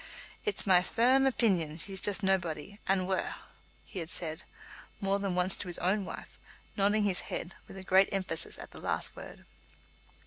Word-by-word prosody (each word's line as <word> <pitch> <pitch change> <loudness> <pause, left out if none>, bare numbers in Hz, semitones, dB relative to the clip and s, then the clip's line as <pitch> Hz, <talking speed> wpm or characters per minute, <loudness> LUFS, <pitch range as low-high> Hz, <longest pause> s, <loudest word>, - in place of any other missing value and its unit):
"It's 425 - +1
my 185 -3 +6
fer 240 +7 +4
rm 270 - +4
opeenion 175 -10 +1
she's 190 +2 -2
jist 205 0 +2
naebody 190 0 -1
and 190 -1 +2
waur," 190 -1 -1 0.5
he 190 - -7
had 165 -1 -5
said 160 -2 -3 0.6
more 195 -1 +1
than 195 -2 -1
once 180 +1 +2
to 185 - -5
his 175 - -2
own 190 +3 +1
wife, - - -9 0.4
nodding 205 +1 +3
his 195 -3 +2
head 175 - -4
with 190 -1 -9
great 190 +1 +5
emphasis 195 -1 -1
at - - -9
the - - -11
last - - -1
word. - - -10
190 Hz, 175 wpm, -31 LUFS, 180-200 Hz, 0.6 s, my